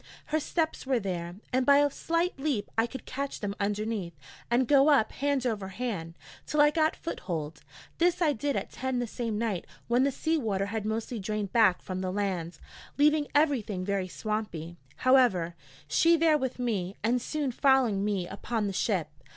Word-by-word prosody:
Her 310 Hz, -, +4 dB
steps 320 Hz, -2 st, -2 dB
were 260 Hz, -3 st, +2 dB
there, 175 Hz, -4 st, -4 dB, 0.2 s
and 260 Hz, 0 st, +3 dB
by 280 Hz, +2 st, +6 dB
a 290 Hz, 0 st, +4 dB
slight 335 Hz, +1 st, -1 dB
leap 270 Hz, -8 st, -1 dB
I 225 Hz, +1 st, +2 dB
could 265 Hz, 0 st, -8 dB
catch 275 Hz, +1 st, -4 dB
them 200 Hz, -2 st, -3 dB
underneath 205 Hz, -3 st, -2 dB, 0.3 s
and 240 Hz, +1 st, +2 dB
go 280 Hz, 0 st, +5 dB
up 265 Hz, -7 st, +4 dB
hand 280 Hz, -2 st, -1 dB
over 210 Hz, -5 st, -1 dB
hand, 190 Hz, -6 st, -4 dB, 0.3 s
till 300 Hz, -, -1 dB
I 295 Hz, 0 st, +6 dB
got 315 Hz, 0 st, +2 dB
foothold; 165 Hz, -, -5 dB, 0.4 s
this 350 Hz, +1 st, +3 dB
I 315 Hz, -4 st, +3 dB
did 280 Hz, +3 st, -2 dB
at -, -, -3 dB
ten 260 Hz, 0 st, -2 dB
the 245 Hz, -, 0 dB
same 230 Hz, -1 st, -3 dB
night 210 Hz, -6 st, -2 dB, 0.2 s
when 245 Hz, +2 st, +3 dB
the 280 Hz, -, +2 dB
sea 320 Hz, +4 st, 0 dB
water 200 Hz, -6 st, -1 dB
had 215 Hz, +1 st, -3 dB
mostly 225 Hz, +2 st, -3 dB
drained 205 Hz, 0 st, -3 dB
back 215 Hz, -6 st, +4 dB
from 185 Hz, 0 st, -4 dB
the 185 Hz, -1 st, -2 dB
land, 185 Hz, -4 st, -2 dB, 0.4 s
leaving 300 Hz, 0 st, +4 dB
everything 240 Hz, -11 st, +1 dB
very 200 Hz, -2 st, -1 dB
swampy, 185 Hz, -5 st, -4 dB, 0.2 s
however; 240 Hz, -10 st, +3 dB, 0.3 s
she 335 Hz, 0 st, +4 dB
there 320 Hz, -1 st, +4 dB
with 260 Hz, -2 st, -3 dB
me, 205 Hz, -6 st, -2 dB
and 240 Hz, +3 st, +2 dB
soon 290 Hz, 0 st, -2 dB
following 250 Hz, -6 st, +3 dB
me 200 Hz, -4 st, -1 dB
upon 215 Hz, +3 st, -3 dB
the 200 Hz, -, -2 dB
ship. 185 Hz, -4 st, 0 dB
230 Hz, 185 wpm, -29 LUFS, 195-280 Hz, 0.4 s, by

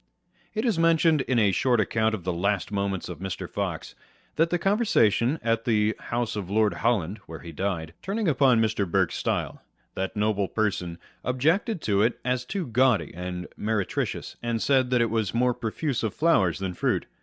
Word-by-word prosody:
It 220 Hz, +3 st, -1 dB
is 220 Hz, -9 st, +1 dB
mentioned 165 Hz, -2 st, +4 dB
in 130 Hz, -1 st, 0 dB
a 105 Hz, -4 st, +4 dB
short 120 Hz, +5 st, +2 dB
account 110 Hz, +1 st, +1 dB
of 95 Hz, -, -9 dB
the 90 Hz, 0 st, -1 dB
Last 100 Hz, +2 st, -1 dB
Moments 100 Hz, -2 st, -2 dB
of 90 Hz, -4 st, -7 dB
Mr. 95 Hz, -1 st, -4 dB
Fox, -, -, -4 dB, 0.4 s
that 165 Hz, +1 st, +3 dB
the 175 Hz, -, +1 dB
conversation 170 Hz, -, +2 dB
at 115 Hz, -1 st, +1 dB
the 110 Hz, -2 st, +2 dB
house 115 Hz, -1 st, -2 dB
of 100 Hz, -4 st, -4 dB
Lord 105 Hz, +1 st, +2 dB
Holland 105 Hz, -4 st, 0 dB
(where 80 Hz, -3 st, -8 dB
he 85 Hz, -, -8 dB
died) 80 Hz, -2 st, -3 dB
turning 205 Hz, +2 st, -2 dB
upon 130 Hz, -5 st, +4 dB
Mr. 105 Hz, -4 st, 0 dB
Burke's -, -, +1 dB
style, -, -, -2 dB, 0.3 s
that 95 Hz, 0 st, -3 dB
Noble 105 Hz, -2 st, +1 dB
Person 90 Hz, -6 st, -1 dB, 0.3 s
objected 160 Hz, -, +1 dB
to 100 Hz, -2 st, +1 dB
it 115 Hz, +3 st, +1 dB
as 125 Hz, 0 st, 0 dB
too 195 Hz, +4 st, -3 dB
gaudy 125 Hz, -1 st, +2 dB
and 90 Hz, +1 st, -5 dB
mere 105 Hz, -2 st, -1 dB
tricious, -, -, -4 dB
and 120 Hz, -1 st, -1 dB
said 130 Hz, 0 st, +2 dB
that 125 Hz, -1 st, +3 dB
it 115 Hz, -, +1 dB
was 110 Hz, -3 st, -1 dB
more 125 Hz, +1 st, +3 dB
profuse 125 Hz, +4 st, -2 dB
of 110 Hz, -3 st, -2 dB
flowers 100 Hz, -, +3 dB
than 95 Hz, -1 st, -3 dB
fruit. -, -, 0 dB
110 Hz, 190 wpm, -26 LUFS, 100-130 Hz, 0.4 s, mentioned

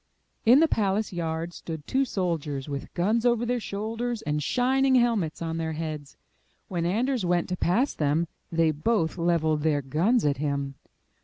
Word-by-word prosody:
In 255 Hz, +6 st, +8 dB
the 325 Hz, -, +5 dB
palace 205 Hz, -4 st, 0 dB
yard 165 Hz, 0 st, -3 dB
stood 160 Hz, -4 st, -7 dB
two 270 Hz, +1 st, +1 dB
soldiers 160 Hz, -, -2 dB
with 140 Hz, -1 st, -5 dB
guns 215 Hz, +6 st, +1 dB
over 240 Hz, -1 st, +2 dB
their 245 Hz, +1 st, 0 dB
shoulders 225 Hz, +3 st, -3 dB
and 150 Hz, 0 st, -1 dB
shining 260 Hz, -, +2 dB
helmets 225 Hz, -11 st, +1 dB
on 165 Hz, 0 st, -3 dB
their 160 Hz, -1 st, -2 dB
heads. 155 Hz, -2 st, -5 dB, 0.5 s
When 170 Hz, -2 st, -1 dB
Anders 240 Hz, +5 st, 0 dB
went 175 Hz, -1 st, +1 dB
to 180 Hz, -, -1 dB
pass 230 Hz, +11 st, +1 dB
them, 155 Hz, +3 st, +1 dB, 0.2 s
they 165 Hz, -1 st, +3 dB
both 165 Hz, +2 st, 0 dB
leveled 160 Hz, -3 st, +1 dB
their 145 Hz, -2 st, +1 dB
guns 175 Hz, -, +2 dB
at 145 Hz, -1 st, +2 dB
him. 140 Hz, -1 st, -2 dB
175 Hz, 165 wpm, -26 LUFS, 155-230 Hz, 0.5 s, In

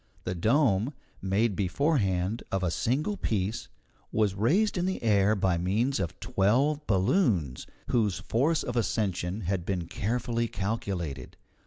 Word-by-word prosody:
The 90 Hz, -, -2 dB
dome, 115 Hz, -, +2 dB, 0.3 s
made 100 Hz, +2 st, +1 dB
beforehand 100 Hz, -, 0 dB
of 95 Hz, -1 st, -1 dB
a 90 Hz, -, +1 dB
single 150 Hz, -, 0 dB
piece, 110 Hz, -, -2 dB, 0.4 s
was 105 Hz, -3 st, +2 dB
raised 160 Hz, -, +2 dB
in 180 Hz, 0 st, 0 dB
the 190 Hz, -, -3 dB
air 105 Hz, -1 st, +3 dB
by 95 Hz, -3 st, +1 dB
means 110 Hz, +9 st, 0 dB
of 85 Hz, -5 st, -3 dB
twelve 135 Hz, +10 st, +1 dB
balloons, 95 Hz, -, +1 dB, 0.2 s
whose 105 Hz, -6 st, +1 dB
force 150 Hz, +8 st, +1 dB
of 120 Hz, -, -4 dB
ascension 100 Hz, -4 st, -1 dB
had 95 Hz, -1 st, -1 dB
been 90 Hz, -2 st, -2 dB
carefully 115 Hz, +5 st, -1 dB
calculated. 95 Hz, -, -4 dB
105 Hz, 135 wpm, -28 LUFS, 95-120 Hz, 0.4 s, air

